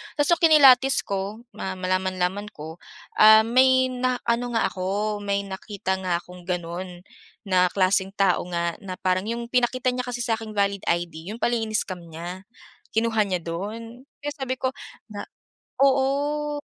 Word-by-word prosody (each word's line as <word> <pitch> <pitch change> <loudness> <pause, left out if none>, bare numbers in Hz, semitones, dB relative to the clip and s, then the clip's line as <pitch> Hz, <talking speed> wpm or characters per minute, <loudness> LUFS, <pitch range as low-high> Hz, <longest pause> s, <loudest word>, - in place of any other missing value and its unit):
Tas 290 -1 +1
nung 340 - +4
kinilatis 270 -4 +7
ko, 200 +3 -4
ma 190 -1 -4
malaman-laman 185 +1 -1
ko, 155 +2 -8 0.4
ah, 220 0 +8
may 260 +2 +4
na 255 0 -1
ano 240 +1 -1
nga 225 - +2
ako 185 - -7 0.4
may 200 0 -1
nakita 190 -1 -4
nga 180 -2 -1
akong 180 -1 -14
ganon 175 0 -5 0.4
na 185 -3 +3
klaseng 190 0 +1
tao 195 -3 +2
nga 170 -1 -1
na 185 -2 -6
parang 185 +2 0
'yung 235 +1 -3
pinakita 255 0 +1
niya 250 0 -3
kasi 245 0 -4
sa'king 225 -2 -2
valid 200 -1 0
ID 170 -1 -2
'yun 225 - -8
pala 240 - +1
in-scam 215 -5 -2
niya, 170 +3 -8 0.5
kinuha 225 -1 +2
niya 185 -2 -1
dun. 225 +8 -6 0.2
Kaya 290 - -2
sabi 265 -2 -3
ko 260 - 0 0.4
na 205 -1 -6 0.6
oo. 285 +2 +1
205 Hz, 155 wpm, -24 LUFS, 185-245 Hz, 0.6 s, ah